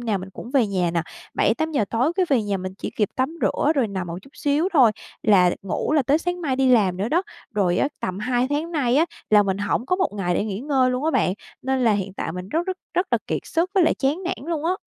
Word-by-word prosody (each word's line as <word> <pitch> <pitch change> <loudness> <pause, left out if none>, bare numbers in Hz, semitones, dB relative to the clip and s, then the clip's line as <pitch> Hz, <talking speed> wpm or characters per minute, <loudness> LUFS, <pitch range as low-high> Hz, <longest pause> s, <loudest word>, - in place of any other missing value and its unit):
nào 220 -5 -1
mình 190 +1 -8
cũng 230 - -9
về 260 -4 +3
nhà 185 -4 0
nè, 170 -1 0 0.3
7:00-8:00 315 -8 +1
tối 255 +8 +1
cái 370 -2 +2
về 255 -6 +3
nhà 200 -1 -1
mình 185 0 -5
chỉ - - -4
kịp 210 -3 +2
tắm 265 +6 -1
rửa 300 - +2
rồi 260 -6 +1
nằm 190 -3 -4
một 170 - -5
chút 275 - -17
xíu 295 +5 +1
thôi 255 -9 +6 0.3
là 185 -5 +5
ngủ 195 +9 -2
là 300 - +4
tới 280 +5 +2
sáng 355 +1 -3
mai 270 -5 -1
đi 265 -1 +3
làm 200 -7 +4
nữa 200 +4 -1
đó. 340 +6 +2 0.3
Rồi 185 -4 +2
á, - - +2
tầm 185 +1 -3
2 245 +2 +1
tháng 310 +4 -1
nay 260 -6 +1
á, 315 - +5 0.3
là 210 -1 +7
mình 195 -1 -1
hổng 205 +4 -1
có 365 - +1
một 380 - +1
ngày 180 -4 -1
để - - 0
nghỉ 205 -1 -4
ngơi 265 -2 +2
luôn 250 +4 -2
á 320 - +2
bạn, 185 - +1 0.3
nên 265 -1 0
là 225 - +5
hiện 195 -1 -2
tại 160 - -4
mình 180 +1 -6
rất, 330 - -1
rất, 375 0 -2 0.2
rất 360 - +1
là - - +3
kiệt - - -1
sức 340 +3 0
với 375 -4 +5
lại - - +3
chán 290 +7 -1
nản 355 -5 -4
luôn 315 -2 -2
á. 345 - +2
255 Hz, 275 wpm, -23 LUFS, 200-310 Hz, 0.3 s, là